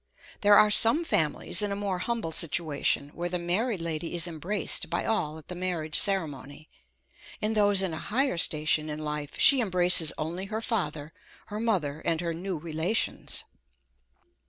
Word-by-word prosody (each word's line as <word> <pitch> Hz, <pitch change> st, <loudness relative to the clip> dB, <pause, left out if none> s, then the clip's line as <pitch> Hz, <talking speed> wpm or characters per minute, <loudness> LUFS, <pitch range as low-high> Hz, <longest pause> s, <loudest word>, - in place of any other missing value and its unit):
There 205 Hz, 0 st, +6 dB
are 210 Hz, -, +5 dB
some 230 Hz, +11 st, +5 dB
families 320 Hz, -, 0 dB
in 205 Hz, -1 st, -2 dB
a -, -, -2 dB
more 200 Hz, -2 st, -3 dB
humble 230 Hz, -4 st, -3 dB
situation, 155 Hz, -3 st, +1 dB
where 175 Hz, +4 st, -5 dB
the 180 Hz, -, -2 dB
married 185 Hz, +4 st, -1 dB
lady 165 Hz, +1 st, -4 dB
is 170 Hz, 0 st, 0 dB
embraced 175 Hz, +5 st, -2 dB
by -, -, -2 dB
all 160 Hz, -9 st, -1 dB
at 160 Hz, -, -14 dB
the -, -, -7 dB
marriage 175 Hz, -4 st, -3 dB
ceremony; 155 Hz, -6 st, 0 dB, 0.7 s
in 215 Hz, +1 st, -1 dB
those 205 Hz, -2 st, +4 dB
in 185 Hz, -4 st, 0 dB
a 160 Hz, -, -5 dB
higher 250 Hz, -2 st, -1 dB
station 155 Hz, 0 st, +2 dB
in 150 Hz, -, -5 dB
life, 150 Hz, -1 st, -5 dB
she 275 Hz, -3 st, +7 dB
embraces 180 Hz, -5 st, +2 dB
only 170 Hz, +5 st, -4 dB
her 215 Hz, +2 st, -4 dB
father, 160 Hz, -9 st, -3 dB, 0.4 s
her 210 Hz, -, -3 dB
mother, 170 Hz, -10 st, -1 dB
and 165 Hz, -2 st, 0 dB
her 170 Hz, -1 st, -3 dB
new 180 Hz, +2 st, -5 dB
relations. 165 Hz, +7 st, -2 dB
175 Hz, 165 wpm, -27 LUFS, 155-205 Hz, 0.7 s, she